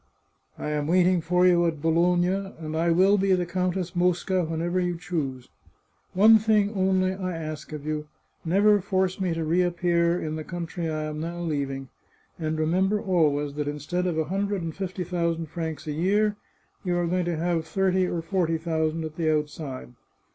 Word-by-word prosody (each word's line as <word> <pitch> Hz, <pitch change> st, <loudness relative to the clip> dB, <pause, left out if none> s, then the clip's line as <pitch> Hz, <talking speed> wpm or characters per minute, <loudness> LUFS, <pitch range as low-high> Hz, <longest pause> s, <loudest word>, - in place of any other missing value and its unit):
I 150 Hz, -, -4 dB
am 150 Hz, -1 st, -1 dB
waiting 180 Hz, +1 st, +3 dB
for 180 Hz, +2 st, +2 dB
you 175 Hz, -1 st, +5 dB
at 160 Hz, -2 st, -2 dB
Bologna, 175 Hz, +3 st, +2 dB, 0.2 s
and 155 Hz, -1 st, -5 dB
I 165 Hz, +2 st, +1 dB
will 190 Hz, +4 st, +4 dB
be 195 Hz, 0 st, +3 dB
the 180 Hz, -1 st, +1 dB
Countess 180 Hz, 0 st, -2 dB
Mosca 180 Hz, +1 st, +1 dB
whenever 165 Hz, +3 st, -1 dB
you 175 Hz, -1 st, -1 dB
choose. 135 Hz, -8 st, -4 dB, 0.7 s
One 220 Hz, +4 st, +7 dB
thing, 210 Hz, -1 st, +2 dB
only, 185 Hz, -1 st, +2 dB
I 185 Hz, -2 st, -4 dB
ask 155 Hz, -2 st, -6 dB
of 150 Hz, -1 st, -7 dB
you: 150 Hz, 0 st, -3 dB, 0.4 s
never 205 Hz, +4 st, +4 dB
force 190 Hz, -1 st, 0 dB
me 180 Hz, -3 st, 0 dB
to 165 Hz, -, -2 dB
reappear 175 Hz, 0 st, +2 dB
in 155 Hz, 0 st, -3 dB
the 155 Hz, -, -5 dB
country 170 Hz, 0 st, -4 dB
I 155 Hz, -1 st, -2 dB
am 155 Hz, 0 st, -4 dB
now 170 Hz, +2 st, -4 dB
leaving; 140 Hz, -5 st, -3 dB, 0.5 s
and 155 Hz, -1 st, -2 dB
remember 185 Hz, +6 st, +1 dB
always 150 Hz, -7 st, +1 dB
that 145 Hz, 0 st, -3 dB
instead 150 Hz, +5 st, -2 dB
of 170 Hz, -3 st, -1 dB
a 160 Hz, -, +2 dB
hundred 195 Hz, +2 st, -2 dB
and 165 Hz, -1 st, -4 dB
fifty 185 Hz, -1 st, -4 dB
thousand 170 Hz, -2 st, -2 dB
francs 160 Hz, -2 st, -4 dB
a 155 Hz, -, -3 dB
year, 205 Hz, +7 st, +1 dB, 0.5 s
you 180 Hz, -2 st, 0 dB
are 175 Hz, -, +1 dB
going 180 Hz, +1 st, 0 dB
to 170 Hz, -2 st, -1 dB
have 165 Hz, -1 st, -1 dB
thirty 185 Hz, +1 st, +1 dB
or 170 Hz, -2 st, -3 dB
forty 170 Hz, -3 st, 0 dB
thousand 160 Hz, 0 st, -1 dB
at 155 Hz, 0 st, -7 dB
the 160 Hz, -2 st, +1 dB
outside. 150 Hz, -4 st, -3 dB
170 Hz, 185 wpm, -26 LUFS, 155-185 Hz, 0.7 s, One